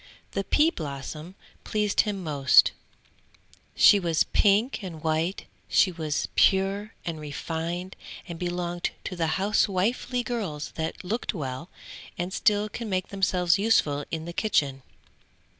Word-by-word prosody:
The 195 Hz, -, -2 dB
pea 305 Hz, -, +3 dB
blossom 150 Hz, -, -7 dB, 0.3 s
pleased 210 Hz, -1 st, +1 dB
him 200 Hz, -3 st, -3 dB
most, 140 Hz, -4 st, +5 dB, 1.0 s
she 205 Hz, -, +7 dB
was 165 Hz, -4 st, +2 dB
pink 210 Hz, +4 st, +2 dB
and 165 Hz, -5 st, -7 dB
white, 160 Hz, +4 st, -1 dB, 0.2 s
she 190 Hz, -, +4 dB
was 160 Hz, -3 st, -2 dB
pure 195 Hz, +3 st, +2 dB
and 165 Hz, -2 st, -4 dB
refined 165 Hz, +4 st, -4 dB, 0.3 s
and 170 Hz, -2 st, -7 dB
belonged 175 Hz, -1 st, -2 dB
to 185 Hz, -, -5 dB
the 165 Hz, 0 st, 0 dB
housewifely 210 Hz, +5 st, +1 dB
girls 190 Hz, -12 st, -4 dB
that 160 Hz, +3 st, -4 dB
look 215 Hz, +7 st, -3 dB
well, 140 Hz, +2 st, -5 dB, 0.5 s
and 180 Hz, +2 st, -3 dB
still 210 Hz, 0 st, +2 dB
can 220 Hz, +1 st, -6 dB
make 185 Hz, -1 st, -1 dB
themselves 185 Hz, -2 st, +2 dB
useful 155 Hz, -10 st, +2 dB
in 160 Hz, -1 st, -4 dB
the 170 Hz, -, -6 dB
kitchen. 145 Hz, -10 st, 0 dB
180 Hz, 130 wpm, -26 LUFS, 160-200 Hz, 1.0 s, she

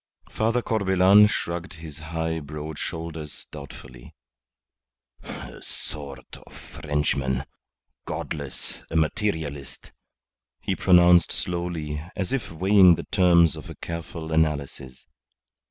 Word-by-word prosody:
Father 115 Hz, +2 st, 0 dB
Corbelan 100 Hz, -1 st, +5 dB
shrugged 85 Hz, -3 st, -3 dB
his 80 Hz, -3 st, -10 dB
high, 80 Hz, +1 st, -3 dB
broad 75 Hz, +1 st, -7 dB
shoulders 80 Hz, -2 st, -6 dB
doubtfully. 65 Hz, -4 st, -11 dB, 1.1 s
"A -, -, -9 dB
sort 70 Hz, -3 st, -6 dB
of -, -, -17 dB
Frenchman 70 Hz, -3 st, -2 dB, 0.6 s
godless 70 Hz, -3 st, -5 dB
a -, -, -6 dB
materialist," 80 Hz, -4 st, -2 dB, 0.7 s
he -, -, -2 dB
pronounced 90 Hz, -2 st, +5 dB
slowly, 85 Hz, -4 st, -3 dB
as 100 Hz, +6 st, -3 dB
if 135 Hz, -, -2 dB
weighing 95 Hz, +1 st, +6 dB
the 85 Hz, -, -7 dB
terms 85 Hz, -4 st, +5 dB
of -, -, -10 dB
a -, -, -8 dB
careful 85 Hz, -1 st, -6 dB
analysis. 70 Hz, -5 st, -1 dB
80 Hz, 105 wpm, -25 LUFS, 75-90 Hz, 1.1 s, weighing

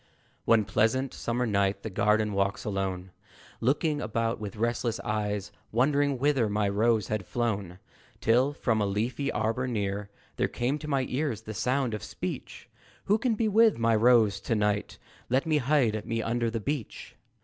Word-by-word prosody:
One 110 Hz, -2 st, +4 dB
pleasant 115 Hz, +7 st, +1 dB
summer 120 Hz, +1 st, -1 dB
night, 100 Hz, -2 st, 0 dB
the 110 Hz, -, -5 dB
garden 105 Hz, +2 st, +2 dB
walks 100 Hz, +5 st, -1 dB
alone, 95 Hz, -3 st, -3 dB, 0.5 s
Looking 145 Hz, +4 st, +1 dB
about 115 Hz, -1 st, -1 dB
with 105 Hz, -2 st, -6 dB
restless 115 Hz, +1 st, -1 dB
eyes, 105 Hz, -1 st, -2 dB, 0.2 s
Wondering 140 Hz, +3 st, +2 dB
whither 135 Hz, -4 st, +2 dB
my 105 Hz, 0 st, +1 dB
Rose 110 Hz, +1 st, +1 dB
had 110 Hz, -2 st, -1 dB
flown, 100 Hz, -5 st, -2 dB, 0.4 s
Till, 125 Hz, +5 st, +3 dB
from 115 Hz, -6 st, 0 dB
a 100 Hz, -, +1 dB
leafy 115 Hz, +7 st, -1 dB
arbor 110 Hz, +4 st, -1 dB
near, 100 Hz, -3 st, -2 dB, 0.3 s
There -, -, +2 dB
came 130 Hz, +5 st, -1 dB
to 150 Hz, -, -7 dB
my 135 Hz, -3 st, +1 dB
ears 130 Hz, -5 st, -2 dB
the 110 Hz, -, -6 dB
sound 125 Hz, +3 st, 0 dB
of 105 Hz, -, -4 dB
speech. -, -, -6 dB, 0.4 s
Who 210 Hz, +2 st, +3 dB
can 240 Hz, -2 st, +1 dB
be 220 Hz, +1 st, +1 dB
with 220 Hz, +1 st, +4 dB
Rose 115 Hz, -2 st, +4 dB
to 115 Hz, -, -1 dB
night? 105 Hz, -1 st, 0 dB, 0.3 s
Let 130 Hz, +5 st, +2 dB
me 155 Hz, -2 st, +2 dB
hide 125 Hz, -6 st, +1 dB
me 115 Hz, 0 st, -2 dB
under 120 Hz, 0 st, 0 dB
the 115 Hz, 0 st, -3 dB
beach. 135 Hz, +1 st, -5 dB
115 Hz, 165 wpm, -28 LUFS, 105-130 Hz, 0.5 s, One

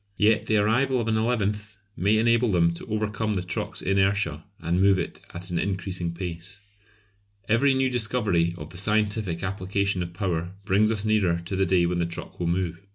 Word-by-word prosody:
Yet 105 Hz, +1 st, +3 dB
the 110 Hz, -, +3 dB
arrival 125 Hz, +5 st, +2 dB
of 115 Hz, -, -2 dB
an 110 Hz, -, +1 dB
eleventh 105 Hz, -3 st, -1 dB, 0.2 s
may 105 Hz, +4 st, +2 dB
enable 115 Hz, +1 st, +3 dB
them 85 Hz, -2 st, +3 dB
to 85 Hz, -, -9 dB
overcome 110 Hz, 0 st, -1 dB
the 95 Hz, -, -1 dB
truck's 90 Hz, -, -4 dB
inertia 95 Hz, -5 st, +1 dB, 0.2 s
and 85 Hz, +2 st, 0 dB
move 100 Hz, 0 st, +5 dB
it -, -, -4 dB
at 90 Hz, +1 st, -7 dB
an 85 Hz, -, 0 dB
increasing 95 Hz, -2 st, -2 dB
pace. 85 Hz, +2 st, -6 dB, 0.9 s
Every 135 Hz, +5 st, +3 dB
new 130 Hz, 0 st, +2 dB
discovery 105 Hz, -8 st, +1 dB
of 75 Hz, -3 st, -9 dB
the 85 Hz, -, -7 dB
scientific 105 Hz, -3 st, 0 dB
application 100 Hz, 0 st, -1 dB
of 85 Hz, -1 st, -4 dB
power 90 Hz, -2 st, -2 dB
brings 105 Hz, +4 st, +3 dB
us 110 Hz, -1 st, 0 dB
nearer 100 Hz, -6 st, +2 dB
to 95 Hz, -, -3 dB
the 95 Hz, 0 st, +1 dB
day 90 Hz, -1 st, +3 dB
when 85 Hz, 0 st, 0 dB
the 85 Hz, -, 0 dB
truck 85 Hz, -, -8 dB
will 85 Hz, -, -1 dB
move. 85 Hz, 0 st, -1 dB
100 Hz, 190 wpm, -25 LUFS, 90-110 Hz, 0.9 s, move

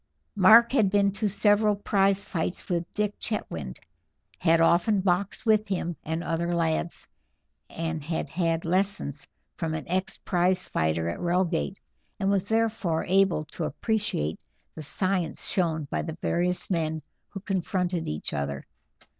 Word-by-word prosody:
Mark 220 Hz, +4 st, +7 dB
had 220 Hz, -7 st, +3 dB
been 200 Hz, 0 st, +3 dB
to 210 Hz, +1 st, -1 dB
several 210 Hz, +1 st, +3 dB
prize 200 Hz, -1 st, +2 dB
fights 170 Hz, +1 st, -3 dB
with 175 Hz, -1 st, -2 dB
Dick 210 Hz, -1 st, -2 dB
Chetwynd, 80 Hz, -, -4 dB, 0.6 s
had 165 Hz, -2 st, +4 dB
often 175 Hz, +5 st, +4 dB
boxed 190 Hz, +4 st, 0 dB
with 215 Hz, -1 st, +3 dB
him 175 Hz, -3 st, -2 dB
and 160 Hz, +2 st, -3 dB
other 170 Hz, +1 st, -1 dB
lads, 165 Hz, 0 st, -1 dB, 0.6 s
and 165 Hz, -1 st, -3 dB
had 160 Hz, +2 st, -2 dB
had 165 Hz, -2 st, -1 dB
lessons 180 Hz, -6 st, -1 dB, 0.3 s
from 160 Hz, -3 st, -2 dB
an 155 Hz, -, -6 dB
ex 185 Hz, +2 st, -1 dB
prize 180 Hz, 0 st, +1 dB
fighter 80 Hz, +1 st, 0 dB
at 85 Hz, -, -3 dB
Reigate, 175 Hz, +1 st, 0 dB, 0.4 s
and 195 Hz, 0 st, +1 dB
was 200 Hz, -1 st, +1 dB
therefore 220 Hz, -7 st, 0 dB
able 190 Hz, -4 st, +2 dB
to -, -, -3 dB
appreciate 210 Hz, -, -1 dB, 0.3 s
the 160 Hz, -, -8 dB
science 185 Hz, +2 st, -1 dB
shown 165 Hz, -4 st, 0 dB
by -, -, 0 dB
the 160 Hz, 0 st, -6 dB
various 180 Hz, +2 st, 0 dB
men 160 Hz, -3 st, -1 dB, 0.3 s
who 195 Hz, -, -7 dB
confronted 180 Hz, -3 st, -1 dB
each 75 Hz, 0 st, -4 dB
other. 70 Hz, -1 st, -3 dB
180 Hz, 145 wpm, -27 LUFS, 165-200 Hz, 0.6 s, Mark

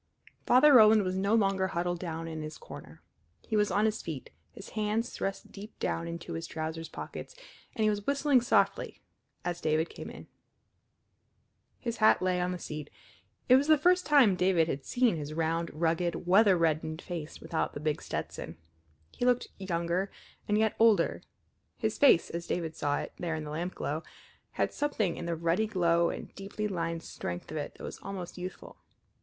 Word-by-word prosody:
Father 280 Hz, +4 st, +7 dB
Roland 215 Hz, -3 st, +8 dB
was 185 Hz, 0 st, -2 dB
no 200 Hz, +3 st, +2 dB
longer 195 Hz, -3 st, +2 dB
huddled 175 Hz, 0 st, -2 dB
down 165 Hz, -2 st, -4 dB
in 160 Hz, -1 st, -5 dB
his 155 Hz, 0 st, -6 dB
corner. -, -, -12 dB, 0.4 s
He 220 Hz, -, -1 dB
was 210 Hz, -1 st, +3 dB
on 210 Hz, +2 st, +2 dB
his 220 Hz, 0 st, 0 dB
feet, 155 Hz, -6 st, -6 dB, 0.2 s
his 200 Hz, -, -11 dB
hands 215 Hz, +2 st, -1 dB
thrust 195 Hz, 0 st, -4 dB
deep 210 Hz, +2 st, -10 dB
down 165 Hz, 0 st, -2 dB
into 170 Hz, 0 st, -6 dB
his 165 Hz, 0 st, -4 dB
trousers 160 Hz, +1 st, -5 dB
pockets, -, -, -8 dB, 0.4 s
and 220 Hz, -, 0 dB
he 215 Hz, -, +4 dB
was 205 Hz, -1 st, -4 dB
whistling 280 Hz, -2 st, +3 dB
softly 240 Hz, -, +1 dB, 0.5 s
as 175 Hz, 0 st, -2 dB
David 155 Hz, +1 st, +1 dB
came -, -, -8 dB
in. -, -, -10 dB, 1.5 s
His 235 Hz, -2 st, -4 dB
hat 215 Hz, -, +5 dB
lay 185 Hz, -1 st, +1 dB
on 180 Hz, 0 st, 0 dB
the 180 Hz, -, -3 dB
seat. 150 Hz, -3 st, -6 dB, 0.6 s
It 255 Hz, -, +8 dB
was 280 Hz, +2 st, +1 dB
the 310 Hz, -1 st, +6 dB
first 360 Hz, +4 st, +3 dB
time 270 Hz, -10 st, +6 dB
David 180 Hz, -3 st, +3 dB
had 135 Hz, -3 st, -3 dB
seen 245 Hz, -8 st, +2 dB
his 150 Hz, 0 st, -5 dB
round, 165 Hz, +1 st, 0 dB
rugged, 170 Hz, +2 st, -1 dB
weather 195 Hz, +1 st, +5 dB
reddened 160 Hz, -1 st, 0 dB
face 165 Hz, -4 st, -6 dB
without 165 Hz, -, -2 dB
the -, -, -5 dB
big 150 Hz, 0 st, -1 dB
Stetson. -, -, -5 dB, 0.5 s
He -, -, -6 dB
looked 250 Hz, 0 st, +2 dB
younger 175 Hz, 0 st, -1 dB, 0.4 s
and 210 Hz, -, +2 dB
yet 220 Hz, 0 st, +2 dB
older; 225 Hz, -2 st, +4 dB, 0.6 s
his -, -, -2 dB
face, 270 Hz, -12 st, +5 dB
as 170 Hz, 0 st, -5 dB
David 165 Hz, -2 st, -2 dB
saw 145 Hz, -1 st, 0 dB
it -, -, -5 dB
there 170 Hz, -2 st, -2 dB
in 155 Hz, -, -4 dB
the 150 Hz, -, -6 dB
lampglow, 160 Hz, -1 st, -3 dB, 0.5 s
had -, -, 0 dB
something 220 Hz, -, 0 dB
in 170 Hz, -, -5 dB
the 170 Hz, -, -1 dB
ruddy 170 Hz, +6 st, +1 dB
glow 170 Hz, -4 st, +2 dB
and -, -, -7 dB
deeply 200 Hz, +2 st, -4 dB
lined 165 Hz, -3 st, -3 dB
strength 90 Hz, +8 st, -6 dB
of 155 Hz, -, -4 dB
it 145 Hz, -, -5 dB
that -, -, -12 dB
was -, -, -7 dB
almost 195 Hz, -3 st, -6 dB
youthful. 185 Hz, +1 st, -8 dB
180 Hz, 185 wpm, -30 LUFS, 165-215 Hz, 1.5 s, Roland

